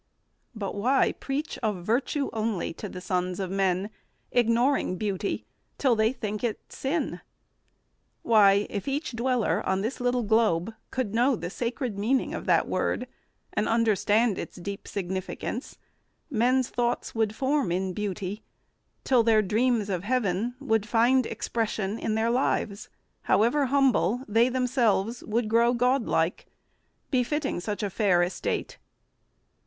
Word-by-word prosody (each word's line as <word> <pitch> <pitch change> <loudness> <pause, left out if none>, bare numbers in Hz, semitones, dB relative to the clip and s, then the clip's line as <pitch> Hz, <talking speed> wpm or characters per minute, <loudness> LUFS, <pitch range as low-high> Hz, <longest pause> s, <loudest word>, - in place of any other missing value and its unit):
But 200 -3 -4
why 255 +7 +2
preach 285 +3 -4
Of 205 -6 -2
virtue 270 +5 0
only 220 -6 -2
to - - -7
the 180 - -8
sons 180 0 -1
of 190 -2 -3
men, 195 +1 0 0.4
Ignoring 240 -2 +2
beauty, 200 -1 -2 0.3
till 260 -4 +3
they 220 +1 +3
think 215 -4 -5
it 230 -3 -1
sin? 300 +5 -2 1.0
Why, 205 -3 +5
if 200 +3 -4
each 285 +2 -2
dweller 240 0 0
on 190 0 0
this 235 +5 -3
little 245 0 +1
globe 220 -3 +2 0.2
Could 250 -6 -2
know 245 +4 +3
the 175 -4 -5
sacred 240 -2 -3
meaning 250 +6 +1
of - - -5
that - - +3
word - - -1 0.5
And 210 - 0
understand 225 -1 +2
its - - -6
deep 195 +2 -7
significance, 190 +6 -4 0.5
Men's 250 +1 +2
thoughts 240 0 -1
would 220 -2 0
form 270 -5 +1
in 185 +1 -1
beauty, 200 0 -4 0.6
till 255 -3 +4
their 220 -1 +4
dreams 225 +1 +1
Of 185 -3 -2
heaven 230 0 0
would 225 -6 0
find 245 +2 +3
expression 220 -2 -2
in 215 - -1
their 225 +1 +1
lives, 225 -4 -1 0.4
However 245 +7 +3
humble; 260 -3 +2
they 225 +4 +3
themselves 245 -3 +1
would 225 +1 0
grow 235 +2 +3
Godlike, 240 -9 +1 0.6
befitting 270 - 0
such 205 +4 -4
a 205 - 0
fair 185 -4 +3
estate. 175 - -3
225 Hz, 140 wpm, -27 LUFS, 200-250 Hz, 1.0 s, Why